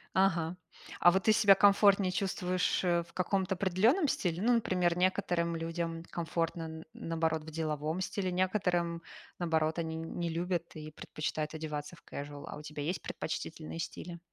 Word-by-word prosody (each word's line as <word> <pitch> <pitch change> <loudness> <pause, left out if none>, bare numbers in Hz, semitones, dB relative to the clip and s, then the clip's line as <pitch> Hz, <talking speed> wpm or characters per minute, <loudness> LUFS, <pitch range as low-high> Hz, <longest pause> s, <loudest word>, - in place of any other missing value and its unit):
Ага. 180 -3 +2 0.4
А 175 - +7
вот 190 0 +1
ты 220 - +6
себя 205 -2 +7
комфортнее 200 -1 +5
чувствуешь, 185 -1 0
э, 175 -2 +2
в - - -20
каком-то 190 +1 0
определенном 210 - +3
стиле? 180 - -1
Ну, 240 +2 +4
например, 180 -6 +2
некоторым 180 -2 +1
людям 165 0 -3
комфортно 165 0 -2
н 160 0 -7
наоборот 160 -1 -1
в 160 - -8
деловом 155 +1 -2
стиле, 190 -1 -2
некоторым, 180 -2 0 0.4
наоборот, 160 -2 +1
они 160 -1 -2
н 165 0 -6
не 170 -1 0
любят 170 +1 -2
и 155 0 -7
предпочитают 155 0 -4
одеваться 150 0 -4
в 150 - -20
кэжуал. 145 0 -7
А - - -7
у - - -9
тебя 150 -1 -6
есть 170 +6 -2
предпочтительные 160 0 -5
стили? 170 +1 -6
170 Hz, 165 wpm, -32 LUFS, 160-185 Hz, 0.4 s, А